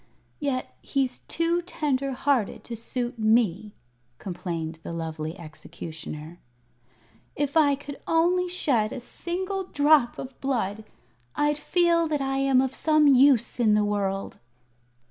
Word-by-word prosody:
"Yet 275 -3 -2
he's 265 -2 -1
too 335 +1 0
tender 275 -6 -1
hearted 255 -5 0
to 235 - -6
suit 240 +1 -4
me," 215 -3 +2 0.5
complained 165 -3 -5
the - - -7
lovely 160 -1 -4
Executioner. 160 0 -9 1.0
"If 285 0 -2
I 290 -3 +5
could 285 0 -10
only 355 +2 +2
shed 250 -11 +1
a - - -5
single 370 +8 -4
drop 290 -6 +3
of 260 -1 -9
blood, 220 -6 -2 0.5
I'd 295 0 +1
feel 340 0 +2
that 300 -2 -1
I 270 0 -1
am 270 -1 +4
of 265 0 -1
some 310 +1 +3
use 260 -3 +4
in 215 -3 +4
the 210 0 +3
world." 195 -1 -2
260 Hz, 130 wpm, -26 LUFS, 210-295 Hz, 1.0 s, I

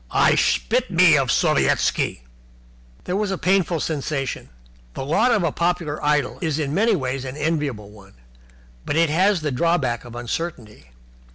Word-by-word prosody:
"I - - +3
spit - - +1
me - - +5
of - - +1
Sovietski!" - - +1 0.8
There 180 - -3
was 205 0 -1
a 195 - -2
painful 185 -3 +1
sensation. 140 -3 -3 0.5
The - - -4
lot 210 - +2
of 215 -6 +2
a 165 - +1
popular 170 -3 -2
idol 150 -3 0
is 160 -4 -1
in 145 -2 -2
many 215 +5 +2
ways 130 -4 -3
an 130 +1 -7
enviable 145 -9 -2
one, 100 -2 -17 0.7
but - - -3
it 165 -1 +2
has 185 +2 +2
the 150 -2 -2
drawback 135 -4 0
of 120 -1 -11
uncertainty. 120 - -6
150 Hz, 160 wpm, -22 LUFS, 130-175 Hz, 0.8 s, me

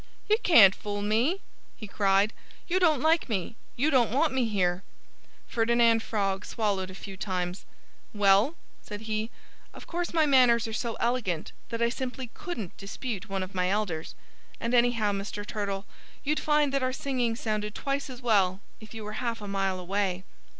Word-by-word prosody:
"You 430 - +4
can't 205 - +8
fool 205 0 -4
me!" 240 - +1 0.4
he 215 - -7
cried. 200 +1 +2 0.3
"You 370 +2 +2
don't 315 -7 +3
like 320 -2 +3
me! 210 +1 -2 0.2
You 290 +6 +2
don't 250 -5 +4
want 280 +5 +2
me 260 -2 +2
here!" 185 -4 0 0.7
Ferdinand 230 -1 +3
Frog 200 -3 -1
swallowed 200 -5 -1
a 185 - -9
few 195 0 -8
times. 185 -1 -3 0.5
"Well," 205 +8 +4 0.3
said 205 -1 -8
he, 220 0 -2 0.5
"of - - -10
course 345 0 -3
my 320 -2 +3
manners 250 -5 +5
are 220 - -6
so 230 +1 -2
elegant 230 -9 -1 0.2
that 230 -1 -1
I 235 - +3
simply 255 -1 -5
couldn't 350 - -6
dispute 210 +1 -5
one 195 -1 -1
of 185 - -8
my 180 -1 +1
elders. 190 -6 -2 0.4
And 235 +1 -2
anyhow, 235 -3 +3
Mr. 205 +1 -4
Turtle, 200 -2 -3 0.4
you'd 305 +2 +1
find 295 -2 +2
that 275 - +1
our 255 0 0
singing 250 -4 -1
sounded 215 -2 -3
twice 275 0 -2
as 255 -1 -9
well 195 -5 +3 0.2
if 215 +1 -12
you 220 - -6
were 215 +3 -5
half 235 -2 -2
a 205 - -7
mile 195 -1 -1
away." 185 0 -1
220 Hz, 175 wpm, -28 LUFS, 195-255 Hz, 0.7 s, can't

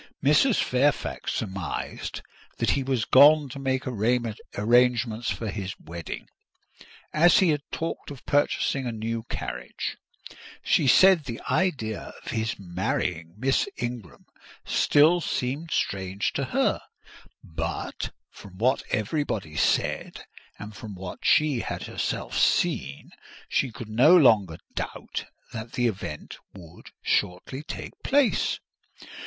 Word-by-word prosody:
Mrs. 150 - +5
Fairfax 125 - 0
surmised 95 -4 -4 0.3
that - - +2
he 140 - +1
was 130 -3 0
gone 145 +1 +7
to 140 - -7
make 130 -1 -1
arrangements 120 0 +1
for 105 +4 -3
his 100 -2 -5
wedding, 85 0 -7 0.9
as 170 +3 +6
he 185 - +4
had 150 -2 +1
talked 165 - -4
of 140 -3 -10
purchasing 140 -2 +1
a - - -1
new 115 +1 -3
carriage: 60 0 -5 0.7
she - - +3
said 185 +3 +6
the 115 -3 -5
idea 130 - -1
of - - -5
his 110 0 -2
marrying 90 - -3
Miss 130 +4 +1
Ingram 120 -6 -6 0.4
still 160 +4 +4
seemed 140 +4 -2
strange 95 - -1
to - - -1
her; - - +1 0.6
but 80 0 -4 0.2
from 95 -2 -13
what 130 +6 +2
everybody 110 - -2
said, - - 0 0.3
and 105 0 -9
from 110 -5 -8
what 90 -1 -7
she 150 -5 +4
had - - -4
herself - - -3
seen, - - +1 0.4
she 130 - 0
could 115 0 -8
no 125 +11 +6
longer 105 - +4 0.2
doubt - - -5 0.3
that 115 0 -7
the 125 - 0
event 95 -9 -4 0.2
would 85 -4 -13 0.2
shortly 90 +10 -1
take 155 - -7
place. 275 -4 +2
120 Hz, 125 wpm, -26 LUFS, 100-140 Hz, 0.9 s, gone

